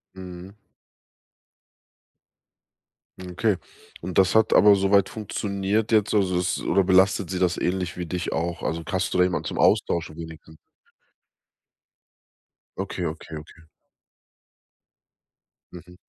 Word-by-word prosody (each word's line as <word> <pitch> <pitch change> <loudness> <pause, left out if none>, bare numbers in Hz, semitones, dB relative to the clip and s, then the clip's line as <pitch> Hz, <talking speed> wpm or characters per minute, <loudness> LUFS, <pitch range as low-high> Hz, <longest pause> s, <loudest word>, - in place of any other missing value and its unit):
Mhm. 90 +1 -10 2.7
Hm, 90 -1 -8
okay 100 +1 +1 0.4
und 90 +1 -5
das 95 -1 +4
hat 110 0 +3
aber 105 -1 +7
soweit 100 0 +3
funktioniert 105 0 -2
jetzt, 105 -2 +2
also, 95 -3 +2
es 90 +1 -1
oder 100 - +2
belastet 95 0 +3
sie 95 - -3
das 90 -1 +1
ähnlich 90 -1 -2
wie 90 -1 -5
dich 90 +1 -3
auch? 85 +1 -3
Also, 80 +2 -2
hast 95 - -1
du - - 0
da 90 - +6
jemand 90 -1 -1
zum - - -5
Austauschen 85 -2 +1
wenigstens? 80 -1 -11 2.2
Okay, - - -4
okay, 80 0 -6
okay. 75 +2 -12 2.1
Mhm. 90 0 -12
90 Hz, 120 wpm, -24 LUFS, 85-100 Hz, 2.7 s, aber